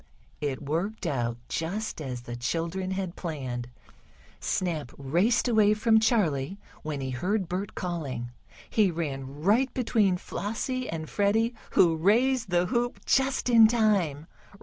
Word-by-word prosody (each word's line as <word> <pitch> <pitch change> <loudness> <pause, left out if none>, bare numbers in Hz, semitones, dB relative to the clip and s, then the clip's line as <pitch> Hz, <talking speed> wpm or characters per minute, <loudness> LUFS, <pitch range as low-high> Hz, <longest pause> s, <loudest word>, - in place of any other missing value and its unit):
It 145 -1 -3
worked 175 +9 -2
out 120 -6 -1
just 190 +3 -3
as 125 -4 -5
the 120 0 -7
children 170 +9 -2
had 190 -2 -3
planned. 130 -8 -4 0.7
Snap 165 -8 -2
raced 175 - +2
away 215 -3 +4
from 220 +1 +4
Charley, 190 - +1 0.2
when 150 -3 -4
he 130 -1 -3
heard 185 - -1
Bert 185 +4 -4
calling. 140 -9 -4 0.4
He 210 -3 +3
ran 145 -4 -4
right 235 +8 +3
between 220 -7 +2
Flossie 250 +7 -3
and 160 -1 -4
Freddie, 220 +6 +1 0.2
who 170 -3 +5
raised 230 +7 +2
the 175 0 +2
hoop 240 +6 -1
just 270 -1 +2
in 230 -2 +8
time. 200 -10 +1
180 Hz, 135 wpm, -27 LUFS, 145-220 Hz, 0.7 s, in